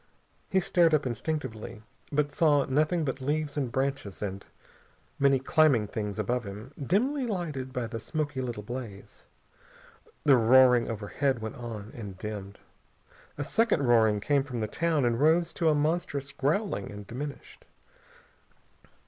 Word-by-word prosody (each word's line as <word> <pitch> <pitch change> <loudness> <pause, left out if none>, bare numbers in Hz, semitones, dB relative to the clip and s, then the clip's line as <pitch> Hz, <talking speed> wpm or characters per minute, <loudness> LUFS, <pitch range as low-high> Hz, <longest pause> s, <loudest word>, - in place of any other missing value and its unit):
He 190 - +3
stared 175 -3 +3
up 150 - 0
instinctively, 120 -3 -4 0.3
but 145 0 +1
saw 145 -2 +3
nothing 155 +4 +1
but 130 -1 -3
leaves 145 +2 -1
and 135 -5 -1
branches 135 -6 -2
and 100 -1 -4 0.8
many 140 -1 +4
climbing 135 -4 +3
things 105 -1 -4
above 120 +4 -1
him, 105 +6 -9
dimly 250 - +1
lighted 155 - -3
by 125 -2 -2
the 115 0 -5
smoky 145 +1 -3
little 120 -4 -4
blaze. 115 -3 -8 1.0
The 140 -4 +6
roaring 125 +1 +5
overhead 115 +5 -1
went 110 -1 -5
on, 115 -3 -7
and 100 -5 -7
dimmed. 100 -1 -7 0.8
A 145 - -2
second 225 -2 +2
roaring 110 -4 +4
came 140 +3 +2
from 130 -4 -5
the 110 - -1
town 160 +2 +1
and 120 -1 +1
rose 165 +3 +3
to 165 -2 +2
a 155 - +3
monstrous 145 -2 -1
growling 150 - -1
and 105 0 -9
diminished. 140 +7 -8
130 Hz, 145 wpm, -28 LUFS, 115-150 Hz, 1.0 s, The